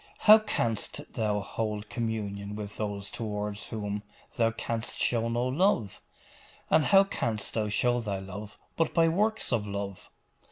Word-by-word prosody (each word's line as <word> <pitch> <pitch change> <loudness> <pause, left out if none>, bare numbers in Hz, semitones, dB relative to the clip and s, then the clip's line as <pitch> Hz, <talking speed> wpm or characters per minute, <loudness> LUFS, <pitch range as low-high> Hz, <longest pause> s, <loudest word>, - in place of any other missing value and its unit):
'How 215 +1 +9
canst 145 - -2
thou 105 -5 0
hold 105 0 -3
communion 105 -3 -3
with 105 -1 -6
those 100 -2 -3
toward 105 -2 -3
whom 105 -1 -4 0.3
thou 115 -2 +3
canst 115 0 -3
show 115 -1 +2
no 120 +1 0
love? 130 - +1 0.7
And 155 -2 +5
how 195 0 +7
canst 115 - -2
thou 110 -2 0
show 120 +4 +2
thy 105 -4 -2
love 95 +2 -8 0.2
but 165 - 0
by 165 -1 +5
works 215 +6 +1
of 105 -3 0
love? 100 -1 -5
110 Hz, 150 wpm, -29 LUFS, 105-125 Hz, 0.7 s, How